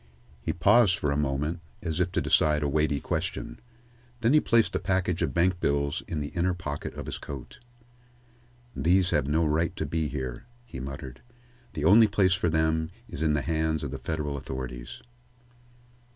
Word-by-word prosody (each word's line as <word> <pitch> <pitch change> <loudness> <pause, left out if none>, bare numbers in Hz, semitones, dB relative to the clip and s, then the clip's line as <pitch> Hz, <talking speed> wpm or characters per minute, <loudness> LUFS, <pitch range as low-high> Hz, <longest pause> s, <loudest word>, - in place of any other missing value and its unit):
He - - -1
paused 110 -7 +4
for 75 - -1
a - - 0
moment, 75 +3 -1 0.2
as 80 -2 -2
if 90 0 +1
deciding 75 -3 +2
a - - +2
weighty 75 0 +1
question. - - -3 0.6
Then 120 +3 +3
he 155 - +7
placed 115 -5 +2
the - - 0
package 95 -3 0
of 80 -5 +1
bank 90 +1 +2
bills 70 -2 0
in 80 - -3
the 75 -1 -3
inner 90 +1 0
pocket 75 -5 -5
of - - -6
his - - -5
coat. 70 -4 -8 1.2
"These 90 +2 +3
have 65 - +1
no 80 +3 +2
right 80 +2 +1
to 80 - -2
be 80 +1 -1
here," 65 - -5 0.2
he 65 - -8
muttered. 65 -1 -7 0.5
"The 75 -2 -2
only 110 +6 +7
place 100 -2 +3
for 90 -2 +1
them 80 0 +1 0.2
is 70 - -7
in 80 -2 +2
the 75 -2 0
hands 80 -1 0
of 70 - -4
the 70 - -5
federal 75 +1 -3
authorities." 65 -2 -7
80 Hz, 180 wpm, -27 LUFS, 70-90 Hz, 1.2 s, he